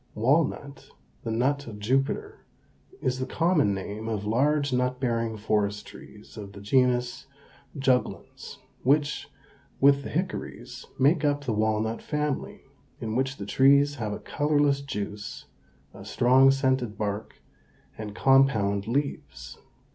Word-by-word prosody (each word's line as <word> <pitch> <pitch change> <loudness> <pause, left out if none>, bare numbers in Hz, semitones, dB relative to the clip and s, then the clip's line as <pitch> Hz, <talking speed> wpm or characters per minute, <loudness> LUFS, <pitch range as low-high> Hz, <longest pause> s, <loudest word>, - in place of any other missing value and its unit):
Walnut 140 +3 0 0.3
(the - - -4
nut 135 +5 0
of 110 -3 -8
Jupiter) 130 +6 -1 0.6
is 130 0 0
the 130 - -3
common 165 - +2
name 100 +3 -5
of 105 -2 -3
large 140 +5 +1
nut 125 0 0
bearing 115 -3 -1
forest 105 -1 -1
trees 105 +2 -14
of 100 -2 -8
the 100 - -10
genus 125 +4 +1 0.5
Juglans, 130 -2 -1 0.2
which, 145 +3 +1 0.5
with 140 0 +5
the - - -7
hickories, 185 +4 -5
make 150 +4 +3
up 145 -1 +1
the 120 - -1
walnut 110 +1 0
family, 150 -2 -3 0.4
in 110 0 -4
which 135 +1 -1
the 100 - -6
trees 140 +5 +4
have 110 -4 -3
a 105 - -3
colorless 145 -1 +1
juice, 105 -5 -6 0.5
a 95 - -11
strong 125 +5 +4
scented 130 -5 +1
bark, 105 0 -4 0.6
and 105 -1 -7
compound 110 -7 +3
leaves. 140 +4 -4
125 Hz, 130 wpm, -26 LUFS, 110-140 Hz, 0.6 s, with